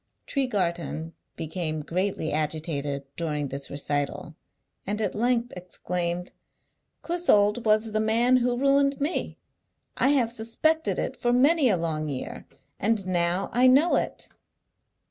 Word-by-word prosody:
Tregarthen 175 - -2 0.2
became 160 -1 -3
greatly 180 0 -2
agitated 150 -2 -2
during 150 -4 -2
this 140 +1 -6
recital, 145 +2 -3 0.5
and 210 +2 -1
at 220 - -1
length 240 +2 0
exclaimed, 180 -1 -3 0.7
"Clissold 240 -11 +2
was 215 +1 +3
the 215 - 0
man 230 +4 +3
who 245 0 +1
ruined 275 +1 +3
me! 295 +5 -2 0.6
I 255 - +3
have 265 -5 +3
suspected 240 +8 +1
it - - -2
for 240 - 0
many 275 +3 +4
a 195 - +3
long 155 -2 -2
year, 130 -3 -6 0.3
and 215 -1 +1
now 175 +1 0
I 250 +2 +5
know 280 +7 +5
it." - - -2
205 Hz, 125 wpm, -26 LUFS, 165-245 Hz, 0.7 s, I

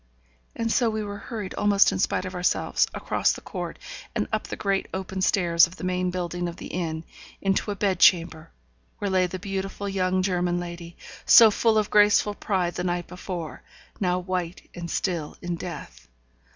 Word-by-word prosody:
and 230 0 -1
so 240 -1 +3
we 215 -1 -2
were 205 0 -6
hurried, 210 -2 -6
almost 205 -1 +4
in - - -3
spite 185 - 0
of 185 - -6
ourselves, 180 0 +1
across - - 0
the - - -8
court, - - -6 0.4
and - - 0
up - - -1
the - - -5
great 195 -2 -1
open 190 0 -4
stairs 175 -3 +4
of 175 - -13
the - - -10
main 180 0 0
building 175 -1 -3
of 170 - -6
the - - -9
inn, 160 -2 -3 0.4
into 195 +2 0
a 205 - -1
bed 195 -3 0
chamber, 165 -4 +4 0.5
where 200 -1 -2
lay 185 -1 +3
the 180 - -5
beautiful 195 +1 -4
young 185 -1 0
German 180 -2 0
lady, 170 -1 -8 0.3
so 225 -2 +8
full 220 +1 +2
of 210 -1 0
graceful 210 0 +5
pride 185 -4 -1
the 180 - -3
night 175 -1 -1
before, 180 -2 -6 0.4
now 180 -2 +1
white 180 -1 -4
and 170 -1 -6
still 170 -5 -2
in 175 -1 -3
death. - - -8
185 Hz, 185 wpm, -25 LUFS, 175-200 Hz, 0.5 s, so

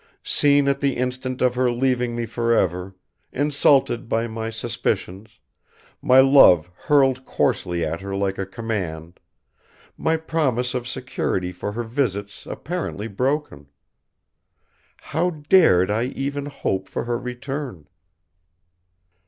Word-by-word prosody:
Seen 145 -1 +4
at 140 0 +1
the 140 -2 0
instant 130 +1 -2
of 125 -1 +3
her 125 0 +1
leaving 125 -1 0
me 120 0 -2
forever; 95 -6 0 0.4
insulted 140 -4 +2
by 115 +1 +1
my 110 -1 -4
suspicions, 110 -2 -3 0.6
my 130 +1 +5
love 110 - +6
hurled 135 +1 +2
coarsely 85 -8 -1
at 85 +3 -4
her 100 0 -5
like 95 -1 -1
a 95 - -3
command, 95 -7 -5 0.8
my 160 0 +1
promise 135 -6 -1
of 125 -1 -3
security 120 -8 -2
for 90 +3 -5
her 120 +2 -3
visits 110 -5 -3
apparently 160 - -4
broken. 125 - -2 1.3
How 170 +4 -1
dared 150 - +4
I 110 +3 0
even 140 +2 -4
hope 95 -9 -3
for - - -3
her 120 0 -2
return? 125 - -6
120 Hz, 120 wpm, -22 LUFS, 100-135 Hz, 1.3 s, love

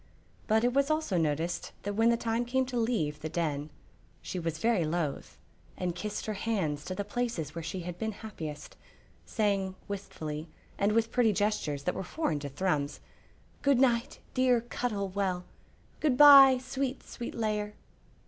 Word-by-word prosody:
But 220 +1 +3
it 245 0 +2
was 280 +1 +2
also 310 -10 0
noticed 165 +1 -1
that 205 - -2
when 225 +3 +4
the 235 - +3
time 230 +1 0
came 260 +2 +1
to 255 -1 -6
leave 195 -11 0
the 155 - -4
Den 155 -3 -2 0.5
she 185 - -5
was 165 -2 -2
very 225 -1 +2
loath, 155 -2 -3 0.4
and 180 -1 -1
kissed 210 +4 -4
her 215 - -2
hands 190 -9 -1
to 185 - -4
the 205 - -3
places 210 - -2
where 165 - -5
she 180 +3 -4
had 175 0 -6
been 220 0 -1
happiest, 160 -9 -8 0.5
saying, 195 -4 0
wistfully, 160 -6 -5 0.3
and 200 +1 +2
with 230 0 +2
pretty 235 -4 +3
gestures 200 -9 -1
that 180 - 0
were - - -4
foreign 180 - -2
to 145 0 -5
Thrums, 145 -1 -1 0.6
"Good 280 -2 +4
night, 245 0 +2 0.2
dear 255 -2 +3
Cuttle 220 -4 -2
Well! 185 -2 -1 0.6
Good 285 -5 +2
by, 275 -2 +10
sweet, 260 +1 -3
sweet 240 - -7
Lair!" 210 -2 -1
205 Hz, 165 wpm, -30 LUFS, 170-240 Hz, 0.6 s, by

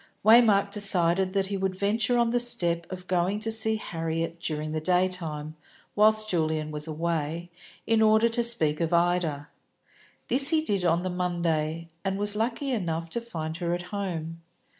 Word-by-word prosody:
Waymark 215 -3 +5
decided 190 -2 +1
that 195 -1 0
he 195 +1 -4
would 190 -1 -2
venture 220 +5 0
on 235 -1 +2
the 245 - +1
step 170 -8 +1
of 185 -1 -7
going 185 +3 0
to 225 +1 -1
see 220 0 +2
Harriet 165 -4 -4
during 155 -2 -3
the 155 0 -3
daytime, 170 -4 -1 0.4
whilst 215 +1 +3
Julian 155 -4 -1
was 150 +1 -4
away, 165 +1 -3 0.3
in 225 0 +2
order 220 +1 +4
to 235 +1 0
speak 165 -10 +2
of 165 +1 -1
Ida. 170 -4 0 0.8
This 270 +3 +4
he 320 -1 +1
did 200 - -1
on 170 +1 +1
the 185 - -3
Monday, 165 -3 -2 0.2
and 195 0 -2
was 205 0 +5
lucky 235 +5 -2
enough 165 -7 -3
to 235 - -3
find 160 -9 -6
her 175 -1 -2
at 175 - -6
home. 165 -5 -5
180 Hz, 170 wpm, -26 LUFS, 165-215 Hz, 0.8 s, Waymark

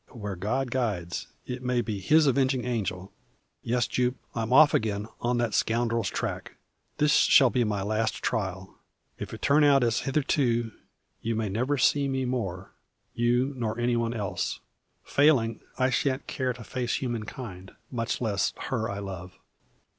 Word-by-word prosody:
"Where 105 -5 -6
God 125 +8 -2
guides 100 -9 -2 0.2
it 125 0 -5
may 125 -1 0
be 110 -4 -4
His 155 - +4
avenging 130 -2 +2
angel. 100 -6 -3 0.5
Yes, 120 0 +1
Jupe; 125 0 0 0.2
I'm 115 0 -2
off 145 +3 +7
again, 105 -2 0
on 120 0 0
that 120 -3 0
scoundrel's 115 -1 +1
track. - - -4 0.4
This 150 0 +3
shall 130 -4 +6
be 125 - +2
my 105 -3 -1
last 110 +2 0
trial. 95 -4 -3 0.4
If - - -6
it - - -9
turn 150 +2 +4
out 140 -2 +5
as 115 -1 +2
hitherto, 130 -5 +1 0.5
you 115 0 -1
may 110 -2 -1
never 125 +8 0
see 140 +2 +3
me 135 -1 -1
more 100 -7 -3 0.4
you, 120 +3 +1
nor 110 -3 -2
any 120 0 +1
one 115 0 -1
else. 95 -5 -2 0.4
Failing, 130 -7 +3 0.2
I 130 0 +2
shan't 130 +2 0
care 130 -1 -2
to 125 -1 -11
face 120 +2 -2
human 120 -4 -3
kind, 95 -6 -8 0.2
much 115 -3 -2
less 105 -5 0 0.2
her 115 -4 -1
I 100 - -4
love. 95 -2 -7
120 Hz, 160 wpm, -27 LUFS, 105-130 Hz, 0.5 s, off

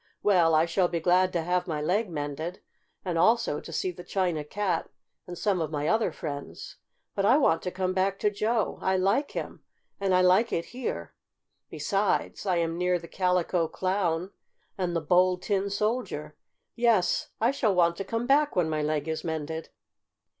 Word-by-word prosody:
"Well, 175 -6 +4
I 155 +1 +4
shall 175 +2 +1
be 170 -1 -2
glad 180 +2 +3
to 170 -2 0
have 180 +2 0
my 155 -3 -2
leg 190 +8 0
mended, 155 +2 -4 0.5
and 175 -3 -1
also 225 -4 +3
to - - -10
see 180 +3 -1
the 180 0 -11
China 175 -4 -1
Cat 180 +2 -2 0.4
and 175 -1 -7
some 195 -2 0
of 155 - -2
my 150 -1 -2
other 220 +3 +2
friends. 145 -4 -7 0.4
But 195 - -1
I 240 +7 +5
want 165 - +3
to 180 - -3
come 185 0 -2
back 190 +1 +1
to 210 - +2
Joe. 215 +1 -1
I 190 0 +1
like 195 +10 +1
him, - - -5 0.4
and 195 -2 +2
I 180 - +5
like 185 +6 +4
it 170 - -1
here. 235 - -4 0.6
Besides, 195 +7 -1
I 185 - +2
am 165 0 -1
near 180 0 +2
the 170 -1 -10
Calico 180 -2 +1
Clown 185 0 -1 0.4
and 180 -2 -2
the 165 - 0
Bold 180 +3 +3
Tin 200 -1 0
Soldier. 215 +5 -2 0.4
Yes, 230 -7 +2
I 230 +3 +3
shall 220 -8 +1
want 170 -1 +3
to 195 - -3
come 230 +4 -3
back 290 +3 +3
when 170 -3 +1
my 155 -1 0
leg 150 0 -1
is 160 0 -3
mended." 160 0 -4
180 Hz, 185 wpm, -27 LUFS, 165-200 Hz, 0.6 s, I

